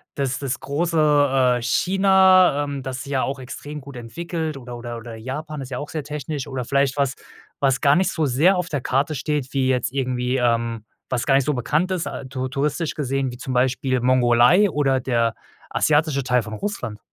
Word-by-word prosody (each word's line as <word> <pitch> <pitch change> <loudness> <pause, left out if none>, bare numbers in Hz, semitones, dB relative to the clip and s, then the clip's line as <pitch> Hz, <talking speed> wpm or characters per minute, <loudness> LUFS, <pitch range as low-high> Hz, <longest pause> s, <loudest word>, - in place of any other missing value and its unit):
das 135 -2 -1
das 135 -2 -3
große, 145 -4 +2
äh, - - -7
China, 185 +2 +4
ähm, 140 -1 -4
das 130 0 -5
sich 140 - -9
ja 130 - +1
auch 135 0 -3
extrem 145 +3 -7
gut 140 0 -11
entwickelt, 160 +5 -4
oder 125 -2 -8
oder 120 0 -6
oder 115 0 -9
Japan, 140 +6 -6
ist 130 - -7
ja 125 - -4
auch 145 +1 -6
sehr 155 -1 -4
technisch, 150 0 -5
oder 130 -2 -4
vielleicht 140 +1 +1
was 140 -1 +1 0.4
was 135 -1 +1
gar 140 -1 +5
nicht 185 +1 +2
so 160 - -1
sehr 150 +9 +3
auf 180 -1 -2
der 145 -5 -2
Karte 140 +5 0
steht, 145 -1 -2
wie 135 -2 +1
jetzt 125 -2 0
irgendwie, 130 -1 -1
ähm 115 -2 0 0.3
was 125 -2 0
gar 135 - +3
nicht 135 -1 +3
so 150 - +1
bekannt 150 +8 0
ist, 185 -3 -1
ah, - - -6
tour 130 -1 -4
touristisch 150 +4 -1
gesehen, 135 -2 -2
wie 120 - -9
zum 130 +1 -6
Beispiel 130 0 +1
die 125 - -3
Mongolei 130 - +5
oder 135 -3 +1
der 115 -3 0 0.4
asiatische 150 -2 +2
Teil 125 -2 +1
von 110 - -8
Russland. 115 - -4
135 Hz, 205 wpm, -22 LUFS, 125-150 Hz, 0.4 s, gar